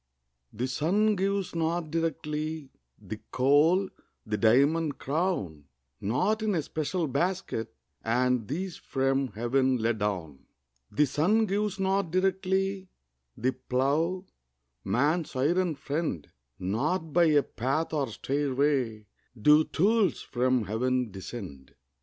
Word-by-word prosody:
The 125 +4 -3
sun 200 +11 +2
gives 195 0 -1
not 165 -1 -1
directly 155 -2 -3 0.3
The 110 - -7
coal, 150 +9 +4 0.4
the 105 -1 -1
diamond 140 +9 +3
crown; 135 - -2 0.3
Not 130 - 0
in 215 -3 0
a 160 - 0
special 160 +3 -2
basket 140 - -2 0.3
Are 125 +3 +2
these 155 - -4
from 135 0 0
Heaven 130 +3 +1
let 115 -1 0
down. 90 -9 -3 0.4
The 150 - +3
sun 180 - +2
gives 205 0 -1
not 195 -1 +1
directly 190 +1 0 0.5
The 130 +3 +1
plough, 155 +9 0 0.6
man's 145 - 0
iron 165 +5 +1
friend; 140 - -3 0.3
Not 150 - -1
by 175 0 +5
a 150 -3 +4
path 135 +8 -2
or 145 -3 0
stairway 135 -3 -1 0.3
Do 150 +7 +6
tools 200 0 +2
from 130 -1 +1
Heaven 125 +3 -1
descend. 95 - -9
145 Hz, 115 wpm, -28 LUFS, 125-180 Hz, 0.6 s, Do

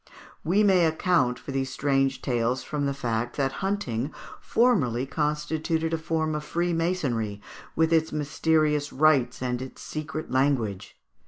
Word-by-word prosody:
We 195 +6 +3
may 185 -4 +5
account 160 -6 +1
for 140 - -8
these 135 -1 -1
strange 135 -1 0
tales 125 0 0
from 145 -2 -2
the 140 - 0
fact 120 -2 -2
that 135 -2 +1
hunting 155 - -1 0.3
formerly 140 - +2
constituted 155 +3 -1
a - - +2
sort 160 -1 -1
of 150 0 -3
freemasonry, 165 - -1 0.4
with 160 +1 +2
its 160 -1 +2
mysterious 150 0 +1
rites 130 -4 +2
and 125 0 -1
its 130 - -8
secret 155 0 -5
language. 130 -8 0
150 Hz, 140 wpm, -26 LUFS, 130-160 Hz, 0.4 s, may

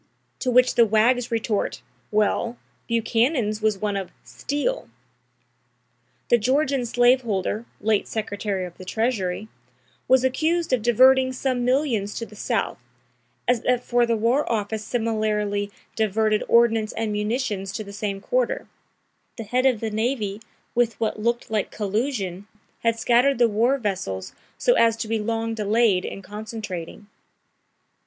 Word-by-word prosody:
To 255 - -1
which 250 0 +4
the 235 -1 +5
wags 235 +3 +3
retort: 225 -2 -1 0.3
'Well, 215 +3 +1 0.3
Buchanan's 230 -1 +1
was 215 -2 +2
one 205 0 -2
of 195 -2 -3
steal.'" 290 - -3 1.4
The 240 - +5
Georgian 265 +1 +1
slave 245 +2 +4
holder, 215 0 -2
late 215 0 +1
secretary 205 -3 -3
of 175 - -10
the - - -8
treasury, 210 -2 -1 0.6
was 260 0 +5
accused 320 +5 +1
of 250 - +2
"diverting" 260 +3 +5
some 255 -1 -1
millions 245 -6 0
to 230 - -4
the 215 - -15
South, 215 - -2 0.7
as 245 -2 +2
that 250 -1 +1
for 240 -1 +2
the 230 -1 +1
war 240 +6 +1
office 215 -1 -2
similarly 215 -3 -1 0.3
"diverted" 215 0 +1
ordnance 225 -2 +3
and 225 -1 -2
munitions 210 -2 -2
to 215 - -4
the 200 -1 -10
same 200 -1 -3
quarter; - - -1 0.7
the 225 - -5
head 250 +5 +1
of 250 -5 +1
the 220 -1 -2
navy, 215 -2 -1 0.3
with 235 -1 +1
what 220 -1 -1
"looked" 235 0 -1
like 215 -3 0
collusion, 205 -3 -2 0.3
had 230 0 +1
scattered 245 +4 +3
the 240 -1 +5
war 230 +5 +2
vessels 190 - -3 0.2
so - - +3
as 230 - +3
to 225 -1 -4
be 225 0 0
long 225 +1 -2
delayed 215 -3 +2
in 195 - -6
concentrating. 210 -3 -7
225 Hz, 145 wpm, -24 LUFS, 210-245 Hz, 1.4 s, the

